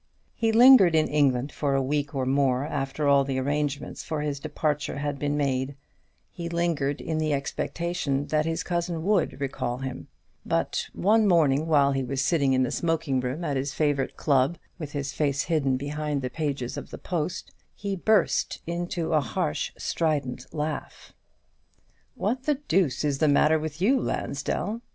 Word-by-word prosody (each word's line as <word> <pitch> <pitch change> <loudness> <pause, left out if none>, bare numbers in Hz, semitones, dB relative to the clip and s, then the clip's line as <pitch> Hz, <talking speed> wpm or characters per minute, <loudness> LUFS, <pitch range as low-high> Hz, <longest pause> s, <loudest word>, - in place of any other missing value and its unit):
He 225 -1 +1
lingered 230 -7 +8
in 155 -1 +3
England 140 -2 +1
for 140 +1 -1
a 135 - +2
week 145 +1 -1
or 130 -1 0
more 135 0 +2
after 145 0 -2
all 140 -1 +5
the 135 -1 -2
arrangements 145 +1 -2
for 155 -2 -3
his 145 -2 -2
departure 150 -1 -2
had 145 -1 -3
been 145 +1 -1
made; 135 -1 -1 0.6
he 170 -2 -6
lingered 165 -4 0
in 160 -1 -2
the 155 -1 +1
expectation 145 0 -2
that 155 0 +1
his 165 0 -1
cousin 170 -2 -2
would 195 -6 +1
recall 130 -3 -2
him: 130 -1 -6 0.4
but - - -1
one 215 +2 +3
morning, 155 -4 +3
while 140 -3 +4
he 135 -1 0
was 135 +1 -1
sitting 140 -6 +2
in 130 0 +3
the 125 - -1
smoking 160 -5 0
room 130 +7 -3
at 145 -4 -1
his 135 +1 -3
favourite 145 -3 0
club, 140 +3 +2 0.2
with 150 -3 -6
his 140 -1 -3
face 140 -2 0
hidden 140 -6 +1
behind 145 0 -3
the 125 - -3
pages 140 -5 -3
of - - -7
the - - -8
"Post," 175 -1 -3 0.2
he 200 -1 -3
burst 205 +1 +2
into 170 0 -2
a 155 - +4
harsh 105 - -2
strident 140 -6 -2
laugh. 150 0 -5 1.0
"What 250 +6 -2
the 300 - +2
deuce 180 - 0
is 145 -2 0
the 155 - +3
matter 150 +2 +4
with 155 0 -5
you, 250 +9 +3
Lansdell?" 205 - -2
150 Hz, 170 wpm, -26 LUFS, 135-165 Hz, 1.0 s, lingered